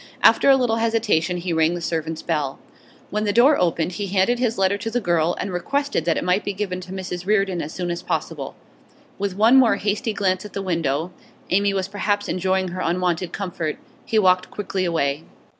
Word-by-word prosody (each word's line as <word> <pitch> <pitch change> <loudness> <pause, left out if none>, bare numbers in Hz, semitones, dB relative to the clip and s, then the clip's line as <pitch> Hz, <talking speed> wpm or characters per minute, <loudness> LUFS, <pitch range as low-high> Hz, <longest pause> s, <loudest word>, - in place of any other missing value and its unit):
After - - +6
a 270 - +8
little 240 -3 +1
hesitation 220 -7 +1
he 175 0 -3
rang 160 +1 +2
the - - -4
servants' 160 -1 -3
bell. 150 -5 -1 0.5
When 210 +2 -1
the 205 - +1
door 245 +5 +5
opened, 170 -1 +1
he 200 +2 -4
handed 195 +6 +2
his 235 -2 0
letter 190 +1 +2
to 225 - -3
the 245 +2 0
girl, 170 -4 +1
and 195 - -3
requested 280 - -1
that 165 -2 +1
it - - -1
might 180 +3 +1
be 205 - -3
given 190 -2 -3
to 185 - -10
Mrs 185 -1 -5
Reardon 195 -4 +1
as 150 - -5
soon 175 0 -3
as 170 - -4
possible. - - -4 0.6
With 200 -2 -2
one 225 +5 +6
more 250 -4 +5
hasty 210 +3 -1
glance 185 -2 0
at 210 - -10
the 195 - -3
window 165 -2 -1 0.4
Amy 200 +2 +3
was 190 -1 -1
perhaps 205 +1 -1
enjoying 185 0 0
her 185 +1 -5
unwonted 175 0 0
comfort 175 -5 -3 0.3
he 225 - -1
walked 185 -3 +3
quickly 195 -2 -3
away. 155 -3 0
185 Hz, 205 wpm, -22 LUFS, 175-210 Hz, 0.6 s, a